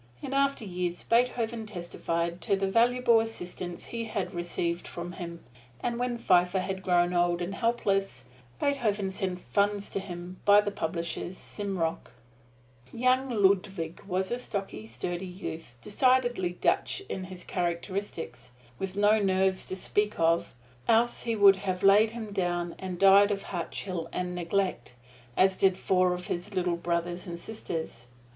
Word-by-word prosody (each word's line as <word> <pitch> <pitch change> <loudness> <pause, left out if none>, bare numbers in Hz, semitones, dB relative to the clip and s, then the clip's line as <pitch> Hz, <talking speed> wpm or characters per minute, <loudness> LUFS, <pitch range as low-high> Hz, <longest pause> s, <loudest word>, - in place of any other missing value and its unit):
In 265 - -5
after 275 -4 +1
years 180 -2 -3
Beethoven 230 -2 +1
testified 170 -2 -3
to 200 - +2
the 195 0 0
valuable 235 +3 +4
assistance 180 -5 -4
he 230 -1 -4
had 210 -4 -3
received 175 0 -2
from 175 0 -6
him; 170 -1 -7 0.4
and 235 - -2
when 245 -1 -1
Pfeiffer 180 -3 +3
had 190 0 -3
grown 175 -1 +2
old 175 0 +2
and 175 +2 -3
helpless, 195 - 0 0.4
Beethoven 215 -9 0
sent 185 -1 -2
funds 205 +1 0
to - - -1
him 180 -1 -8
by 205 0 +7
the 210 0 0
publishers, 170 0 -3
Simrock. 190 -6 -3 0.8
Young 255 +2 +2
Ludwig 190 -6 +1
was 190 0 -1
a 240 - -1
stocky, 195 - -4
sturdy 175 +11 -4
youth, 165 -8 -7
decidedly 245 -4 +2
Dutch 390 +2 +1
in 190 - -4
his 185 -1 -9
characteristics, 175 -6 -3 0.3
with 195 0 -4
no 205 +1 +5
nerves 190 -1 +2
to 185 - -4
speak 210 +2 0
of, 165 -5 +2 0.3
else 235 +1 +3
he 230 -1 -1
would 200 -2 +7
have 185 -2 -3
laid 205 +3 +6
him 220 -2 -7
down 175 -3 -1
and 185 -1 -5
died 195 +2 +7
of 200 -1 -2
heart 175 -3 -4
chill 175 -4 -4
and 180 0 -3
neglect, 180 -7 -1 0.4
as 190 0 +4
did 190 -1 +3
four 185 -1 +2
of 180 0 -7
his 180 +4 -4
little 180 -2 +1
brothers 175 +1 -2
and 170 -1 -5
sisters. 160 - -5
190 Hz, 150 wpm, -29 LUFS, 175-210 Hz, 0.8 s, by